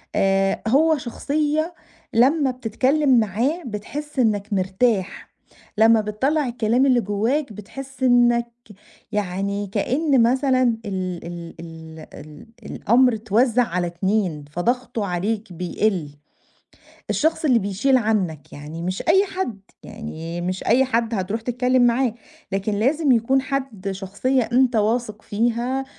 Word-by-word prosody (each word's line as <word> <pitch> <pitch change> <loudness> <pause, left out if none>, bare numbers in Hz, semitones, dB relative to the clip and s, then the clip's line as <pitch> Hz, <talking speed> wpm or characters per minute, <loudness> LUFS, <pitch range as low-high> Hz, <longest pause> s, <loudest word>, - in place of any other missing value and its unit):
آآ 195 0 +2
هو 310 +6 +4
شخصية 300 +5 -1 0.4
لمّا 265 +4 +3
بتتكلّم 255 +3 +2
معاه 235 - -1
بتحس 270 +7 -6
إنك 210 -4 +1
مرتاح، 190 +1 -1 0.4
لمّا 225 0 +5
بتطلّع 260 +8 0
الكلام 240 +2 +1
اللي 255 -3 +4
جوّاك 225 +6 -1
بتحس 260 +6 -9
إنك 240 -1 +4 0.6
يعني، 200 0 -2
كإن 260 - +1
مثلًا 255 -3 +2
ال 185 -3 -4
ال 170 -1 -8
ال 160 -1 -10
ال 150 +4 -12 0.2
الأمر 245 +4 +2
اتوزّع 225 +3 +2
على 180 -5 -2
اتنين، 175 -3 -1
فضغطه 235 +5 -1
عليك 200 +3 -3
بيقِل، 180 -1 -1 1.0
الشخص 320 +1 0
اللي 255 -6 +4
بيشِيل 215 +6 +1
عنك، 200 - -1
يعني 150 +3 -8
مش 185 +2 -3
أي 380 +4 +5
حد، 370 - -4 0.2
يعني 170 -6 -7
مش 185 +2 -3
أي 250 +4 +4
حد 230 -2 0
هترُوح 200 +3 -2
تتكلّم 250 +2 +1
معاه. 240 -1 +1 0.4
لكن 195 +2 -1
لازم 275 +7 +2
يكون 250 +3 +2
حد 260 -8 -3
شخصية 200 +7 -1
أنت 250 -1 +3
واثق 215 0 0
فيها، 240 +5 -1
225 Hz, 120 wpm, -22 LUFS, 195-260 Hz, 1.0 s, لمّا